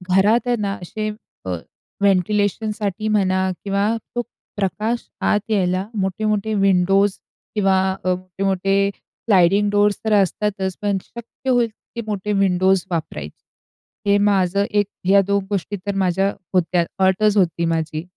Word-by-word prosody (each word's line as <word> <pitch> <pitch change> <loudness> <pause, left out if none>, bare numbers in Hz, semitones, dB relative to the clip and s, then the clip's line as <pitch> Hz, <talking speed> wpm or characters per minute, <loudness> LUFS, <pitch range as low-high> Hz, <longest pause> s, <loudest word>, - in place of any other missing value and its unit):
घरात 220 +6 +3
आहे 245 - +2
ना, 200 -1 -1
असे 215 +4 -4 0.4
अ, - - -4 0.5
व्हेंटिलेशनसाठी 205 +2 0
म्हणा 190 -3 +2
किंवा 200 +3 +1 0.2
तो 240 - +1 0.4
प्रकाश 215 +4 -1
आत 210 - +2
यायला 185 -2 +1 0.2
मोठे-मोठे 215 +2 -1
विंडोज 195 0 +3 0.4
किंवा 195 -2 +3 0.2
अ, 185 - +2
मोठे-मोठे 195 +2 0
स्लाइडिंग 200 0 +1
डोअर्स 205 0 +3
तर 220 - +2
असतातच, 195 -1 -2
पण 205 -1 +1
शक्य 235 +3 -8
होईल 245 -2 +3
तितके 235 +2 -10
मोठे 210 0 -2
विंडोज 190 -1 +3
वापरायचे, 160 - -7
हे 205 - +5
माझं 200 -1 +2
1 205 0 +2 0.2
ह्या 200 +1 +6
2 200 -1 +1
गोष्टी 205 0 -2
तर 200 -1 -2
माझ्या 190 +1 +1 0.2
होत्या, 175 -1 +2 0.2
अटच 210 +2 +2
होती 170 -2 +2
माझी. 160 -1 -1
195 Hz, 130 wpm, -21 LUFS, 185-210 Hz, 0.5 s, ह्या